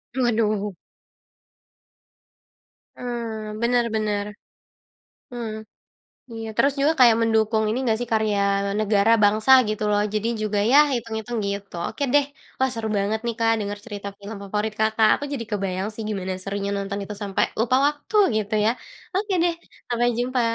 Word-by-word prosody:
Waduh. 215 Hz, -5 st, +1 dB, 2.2 s
Mmm, 225 Hz, -3 st, -5 dB
bener 240 Hz, 0 st, +3 dB
bener. 210 Hz, -1 st, -1 dB, 1.1 s
Mmm, 235 Hz, -2 st, -4 dB, 0.8 s
iya. 225 Hz, 0 st, -6 dB
Terus 280 Hz, 0 st, +4 dB
juga 300 Hz, +3 st, +4 dB
kayak 235 Hz, -3 st, +7 dB
mendukung 220 Hz, -1 st, +2 dB
ini 230 Hz, +4 st, 0 dB
enggak 225 Hz, -3 st, +1 dB
sih 245 Hz, -, -3 dB
karya 215 Hz, -2 st, +1 dB, 0.4 s
negara, 210 Hz, +1 st, +3 dB
bangsa 215 Hz, +5 st, +4 dB, 0.2 s
gitu 215 Hz, 0 st, -2 dB
loh, 205 Hz, 0 st, +2 dB
jadi 215 Hz, +2 st, 0 dB
juga 210 Hz, -1 st, -1 dB
ya 285 Hz, -, +8 dB, 0.2 s
itung-itung 230 Hz, 0 st, -4 dB
gitu. 200 Hz, -2 st, -5 dB
Oke 285 Hz, -, -6 dB
deh. 290 Hz, -1 st, +5 dB, 0.3 s
Wah, 265 Hz, 0 st, +2 dB
seru 225 Hz, -2 st, -3 dB
banget 210 Hz, +2 st, -1 dB
nih 235 Hz, -, -1 dB
Kak, 225 Hz, 0 st, +3 dB
denger 205 Hz, 0 st, -4 dB
cerita 205 Hz, -3 st, -6 dB
film 205 Hz, +1 st, -8 dB
favorit 210 Hz, +2 st, -2 dB
Kakak. 220 Hz, 0 st, +3 dB
Aku 290 Hz, -, -4 dB
jadi 235 Hz, -5 st, -3 dB
kebayang 195 Hz, -1 st, -2 dB
sih 225 Hz, -, -6 dB
gimana 190 Hz, -3 st, -3 dB
serunya 200 Hz, +1 st, -3 dB
nonton 200 Hz, 0 st, -3 dB
itu, 210 Hz, -, -7 dB
sampai 195 Hz, -1 st, +1 dB, 0.2 s
lupa 245 Hz, +3 st, +3 dB
waktu 295 Hz, +8 st, -4 dB, 0.2 s
gitu 215 Hz, 0 st, -1 dB
ya. 225 Hz, -, +4 dB, 0.4 s
Oke 400 Hz, +1 st, -1 dB
deh, 345 Hz, -, +2 dB, 0.4 s
sampai 240 Hz, 0 st, +1 dB
jumpa 250 Hz, +1 st, 0 dB
220 Hz, 150 wpm, -23 LUFS, 205-235 Hz, 2.2 s, ya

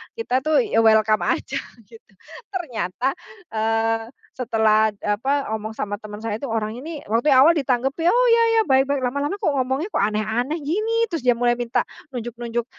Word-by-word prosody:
kita 455 Hz, -, -1 dB
tuh 310 Hz, -, +2 dB
ya 410 Hz, -, +1 dB
welcome 220 Hz, -1 st, +4 dB
aja -, -, -1 dB, 0.3 s
gitu, 225 Hz, -2 st, -17 dB, 0.4 s
ternyata, 250 Hz, -, -2 dB, 0.4 s
eee, 225 Hz, +1 st, 0 dB, 0.3 s
setelah, 220 Hz, -3 st, +2 dB
apa, 270 Hz, +7 st, 0 dB
ngomong 220 Hz, 0 st, -3 dB
sama 205 Hz, 0 st, -3 dB
teman 210 Hz, -1 st, -9 dB
saya 225 Hz, -2 st, -3 dB
itu, 280 Hz, -, -5 dB
"Orang 220 Hz, -1 st, -2 dB
ini" 305 Hz, +3 st, -7 dB
waktu 240 Hz, +6 st, +2 dB
yang 260 Hz, -, +7 dB
awal 335 Hz, -, +5 dB
ditanggep, 260 Hz, -2 st, +1 dB, 0.2 s
"Oh, -, -, +4 dB
iya 465 Hz, 0 st, +5 dB, 0.2 s
iya -, -, +6 dB
baik 265 Hz, 0 st, +4 dB
baik." 280 Hz, -1 st, 0 dB
Lama-lama 285 Hz, +8 st, -1 dB
kok 365 Hz, -, +2 dB
ngomongnya 265 Hz, +7 st, -1 dB
kok -, -, +1 dB
aneh-aneh 220 Hz, +9 st, -2 dB
gini, 445 Hz, +9 st, 0 dB
terus 325 Hz, -7 st, -3 dB
dia 245 Hz, -, +5 dB
mulai 240 Hz, 0 st, +2 dB
minta 240 Hz, -1 st, 0 dB, 0.3 s
nunjuk-nunjuk 240 Hz, 0 st, -4 dB
240 Hz, 175 wpm, -22 LUFS, 220-285 Hz, 0.4 s, yang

